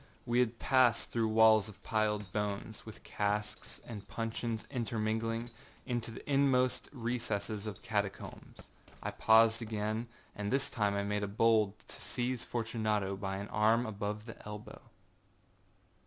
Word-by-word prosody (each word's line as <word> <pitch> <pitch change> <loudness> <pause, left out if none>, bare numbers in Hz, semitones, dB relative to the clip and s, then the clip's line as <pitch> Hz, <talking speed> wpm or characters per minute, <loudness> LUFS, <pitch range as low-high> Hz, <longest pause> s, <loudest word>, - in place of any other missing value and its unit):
We 120 0 +2
had 120 -2 +2
passed 125 -3 +3
through 115 -1 +1
walls 110 -1 +6
of 105 - -13
piled 105 -3 0
bones, 105 +2 -3
with 110 - -10
casks 105 0 -2
and 105 -4 -8
puncheons 115 0 -3
intermingling, 115 -1 -1 0.3
into 120 -2 -2
the 115 - -9
inmost 135 -3 +2
recesses 110 -4 -2
of 105 - -4
the - - -18
catacombs. 100 -3 -4 0.4
I - - -2
paused 115 +1 +5
again, 110 +1 -2 0.3
and 105 0 -3
this 135 +1 +1
time 105 -4 +1
I 100 - 0
made 105 0 -2
bold 110 -3 +4
to - - -9
seize 125 -1 -2
Fortunato 110 -4 -1
by 95 0 -3
an 100 +1 -5
arm 110 +3 +3
above 105 0 -3
the 115 - -10
elbow. 105 0 -8
110 Hz, 140 wpm, -33 LUFS, 105-115 Hz, 0.4 s, walls